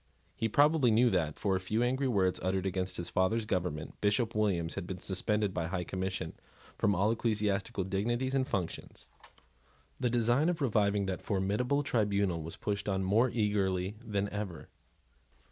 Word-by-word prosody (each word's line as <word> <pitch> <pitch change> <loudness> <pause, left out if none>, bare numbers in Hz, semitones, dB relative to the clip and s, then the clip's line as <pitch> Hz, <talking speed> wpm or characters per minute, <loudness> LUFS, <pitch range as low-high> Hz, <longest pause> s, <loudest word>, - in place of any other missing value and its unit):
He 115 - -1
probably 145 +1 +4
knew 115 +2 +4
that, 80 -5 0
for 95 -2 +1
a - - 0
few 105 +5 0
angry 130 +2 +1
words 95 -6 +1
uttered 95 0 0
against 95 -1 -2
his 85 - -4
father's 105 +5 +1
government, 90 -7 -3
Bishop 105 +3 +1
Williams 95 -6 0
had 85 - -5
been 95 - -4
suspended 100 +2 -1
by 90 - -1
the - - -4
High 90 -1 -2
Commission 95 -2 -3 0.4
from 100 - +2
all 100 +5 +2
ecclesiastical 105 -4 0
dignities 120 +7 -1
and 130 -1 +1
functions. 90 - -4 0.9
The 125 - +1
design 120 +6 +3
of 175 - -1
reviving 105 -6 +2
that 95 -2 -3
formidable 105 +9 0
tribunal 100 - +1
was 80 +2 -6
pushed 100 0 -2
on 95 -1 0
more 110 +7 +3
eagerly 100 -4 0
than 100 -3 -1
ever. 100 -6 -5
100 Hz, 165 wpm, -31 LUFS, 95-115 Hz, 0.9 s, probably